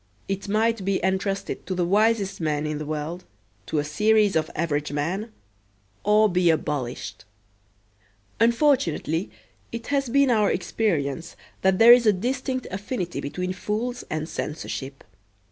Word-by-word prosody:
It 195 +1 -3
might 220 0 +1
be 195 0 +1
entrusted 195 0 -2
to 185 - -2
the 180 -1 +1
wisest 205 0 +2
man 150 -1 0
in 150 -1 -3
the 155 - -5
world, 155 +4 -4 0.4
to 155 - -2
a 145 - +2
series 210 +7 +3
of 155 -1 +1
average 150 -3 -1
men, 180 +10 -2 0.7
or 210 +1 +5
be 180 -2 +2
abolished. 130 -9 -2 1.2
Unfortunately 230 - +2 0.4
it 230 0 -6
has 275 -3 +1
been 275 +1 +4
our 215 -3 +3
experience 170 -5 -1 0.3
that 190 0 +3
there 230 +3 +9
is 240 -2 +4
a 210 - +6
distinct 255 +5 -2
affinity 190 - -4
between 180 +6 -3
fools 225 +6 -3
and 155 0 -3
censorship. 140 -4 -5
190 Hz, 140 wpm, -24 LUFS, 155-220 Hz, 1.2 s, there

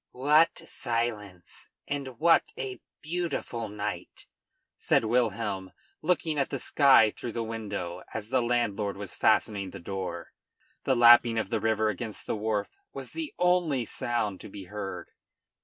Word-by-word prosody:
"What 150 +6 +3
silence! 110 -7 -4 0.2
and 135 -4 -4
what 165 +1 +5
a 130 -1 -5 0.2
beautiful 155 -9 -3
night!" 100 -3 -5 0.5
said - - +2
Wilhelm, 105 -5 -1 0.3
looking 160 -2 0
at 140 - 0
the - - -2
sky 135 -7 +5
through 115 - -7
the 115 - -2
window, 100 -6 -5
as 110 -1 -5
the 130 0 +2
landlord 110 -5 0
was 100 -2 -7
fastening 100 -3 +2
the - - -9
door. 95 +1 -5 0.5
The 130 - +3
lapping 120 -1 +7
of 110 - -2
the - - +1
river 110 -1 +2
against 110 -1 -5
the - - -2
wharf 105 -1 -1 0.2
was - - -7
the 320 -2 -5
only 175 -8 +2
sound 110 -4 -2
to - - -9
be 100 0 -9
heard. 100 +1 -6
115 Hz, 145 wpm, -28 LUFS, 105-130 Hz, 0.5 s, lapping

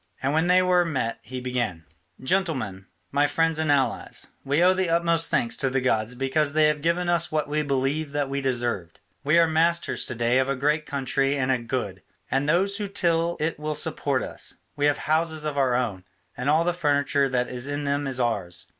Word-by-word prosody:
And 135 +2 +1
when 160 +3 +2
they 180 +1 +5
were 180 -1 +3
met 130 -9 -2
he 130 0 -7
began: 120 -10 -3 0.4
"Gentlemen, 130 - -1 0.2
my 145 +1 +3
friends 165 +1 0
and 160 -2 +1
allies, 140 -2 -1
we 145 +5 +2
owe 185 +1 +6
the 185 -2 -1
utmost 165 -1 +2
thanks 115 -5 +1
to 135 - +1
the 135 +1 0
gods 125 -2 0
because 140 +3 0
they 155 0 +4
have 150 -1 -2
given 170 +3 0
us 170 -1 +1
what 155 -1 0
we 150 +1 0
believed 140 +1 -1
that 145 -1 0
we 140 +1 -3
deserved. 120 -10 -3 0.2
We 150 +4 +3
are 165 -1 +5
masters 165 +2 0
to 130 - -4
day 120 +2 +2
of 130 +1 0
a 140 - 0
great 150 +3 0
country 135 0 0
and 130 -1 +1
a 130 - +1
good; 115 -6 -4 0.3
and 135 +3 +1
those 195 +5 +2
who 205 -2 -3
till 170 -3 +1
it 155 0 -2
will 150 0 -3
support 140 -2 0
us; - - -4 0.2
we 145 0 +2
have 145 - +2
houses 160 0 0
of 150 -1 -2
our 130 -3 +2
own, 110 -7 -2 0.3
and 125 +3 -2
all 155 +3 +4
the 175 +1 0
furniture 145 -4 +1
that 125 -1 0
is 125 +1 0
in 145 0 -3
them 140 0 -1
is 130 -1 +2
ours. 100 -8 -1
145 Hz, 215 wpm, -25 LUFS, 130-165 Hz, 0.4 s, owe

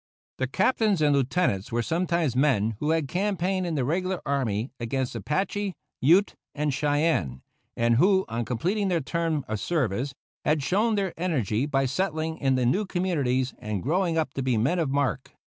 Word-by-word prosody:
The 130 - 0
Captains 205 - +2
and 150 -2 +3
Lieutenants 135 - 0
were 120 0 0
sometimes 170 -3 0
men 120 -6 +2
who 150 - -1
had 160 -3 +1
campaigned 185 +1 -1
in 165 - -2
the 135 -4 0
regular 185 +5 -1
army 125 -4 -1
against 125 +2 -2
Apache, 190 - -2 0.3
Ute, 175 +9 +4 0.2
and 150 -1 0
Cheyenne, 145 - 0 0.3
and 115 0 +3
who, 190 +5 +4
on 115 +1 -2
completing 180 - -1
their 175 -3 +1
term 160 -1 -1
of 110 -1 -3
service, 135 - -1 0.3
had 150 -1 +1
shown 215 +8 +2
their 195 -3 -1
energy 140 - 0
by 135 -2 +1
settling 160 +2 -2
in 135 -2 +2
the 125 -1 +1
new 195 - +1
communities 140 -9 0
and 105 -4 -4
growing 170 +2 +1
up 155 -4 -1
to 135 - -3
be 125 -3 +1
men 135 +12 +1
of 160 -5 0
mark. 135 -6 -1
150 Hz, 175 wpm, -26 LUFS, 125-180 Hz, 0.3 s, Ute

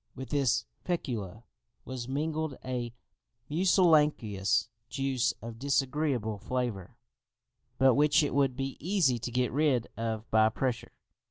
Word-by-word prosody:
With 130 0 -7
this 130 -7 +1 0.2
fecula 115 - -3 0.4
was 125 -2 -5
mingled 155 +1 -2
a 125 -2 -3 0.6
mucilaginous 150 - +3 0.2
juice 135 -3 0
of 115 -1 -7
disagreeable 135 -5 0
flavour, 120 -4 -3 0.8
but 130 0 +5
which 150 +2 +4
it 145 - -1
would 135 -2 +2
be 135 0 -4
easy 160 -8 +2
to 120 +1 -5
get 125 0 0
rid 140 -5 +2
of 115 0 -3
by 110 0 +5
pressure. 120 +1 -3
130 Hz, 120 wpm, -30 LUFS, 115-145 Hz, 0.8 s, but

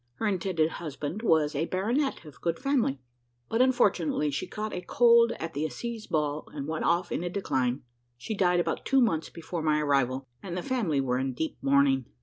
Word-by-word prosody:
Her - - -3
intended 185 -5 +1
husband 155 +4 -5
was 160 -9 +3
a 155 +3 -1
baronet 230 - -1
of 150 - -13
good 170 -1 0
family; 255 - 0 0.5
but 225 - +2
unfortunately 195 - +2
she 140 - -3
caught 215 0 -5
a 180 - -3
cold 235 +4 +5
at 165 0 -6
the 145 +2 -2
assize 220 - -5
ball, 150 -1 -1
and 140 -1 -4
went 160 0 -2
off 175 +1 +1
in - - -1
a 175 - -2
decline. 130 -9 -1 0.3
She 220 - -5
died 180 -3 +2
about 175 - -1
two 270 - +3
months 165 -11 +1
before 170 0 -5
my 155 -1 +2
arrival, 135 -3 +1 0.2
and 180 -2 -5
the 180 - -3
family 215 - 0
were 125 -1 0
in 130 -1 -2
deep 160 - -2
mourning. 135 -2 +3
165 Hz, 195 wpm, -28 LUFS, 145-215 Hz, 0.5 s, cold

